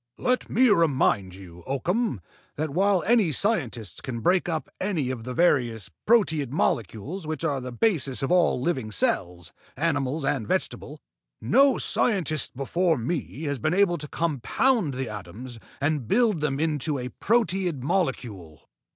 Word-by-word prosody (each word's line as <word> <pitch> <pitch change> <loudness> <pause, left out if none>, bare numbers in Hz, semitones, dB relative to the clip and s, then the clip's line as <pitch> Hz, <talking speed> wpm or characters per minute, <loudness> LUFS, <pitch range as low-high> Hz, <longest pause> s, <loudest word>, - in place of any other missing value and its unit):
"Let 250 0 0
me 255 +3 +4
remind 130 - +2
you, 90 -3 -12
Oakham, 170 - -1 0.3
that 155 0 -2
while 190 +2 +2
any 215 -6 +3
scientist 130 - -1
can 115 -3 -5
break 180 +7 +2
up 160 -2 -2
any 170 -10 -1
of 115 -3 -6
the 125 - -4
various 120 - +1 0.2
proteid 160 - +3
molecules 145 - -2
which 155 +1 -4
are 145 -5 0
the 125 0 -6
basis 140 - 0
of 135 - -1
all 180 -7 +3
living 130 -6 -2
cells, 85 -4 -1 0.3
animal 145 -1 -1
and 135 -7 -1
vegetable, - - -3 0.4
no 270 - +4
scientist 160 - 0
before 165 +4 +1
me 140 +4 -4
has 145 -3 -2
been 155 +9 0
able 190 -3 +3
to 150 - -4
compound 165 - 0
the 130 0 -3
atoms 105 +5 -8 0.2
and 145 -4 -1
build 215 - +2
them 140 -2 -1
into 150 -2 0
a 125 -1 -4
proteid 185 - 0
molecule." 125 - -3
150 Hz, 150 wpm, -25 LUFS, 125-180 Hz, 0.4 s, me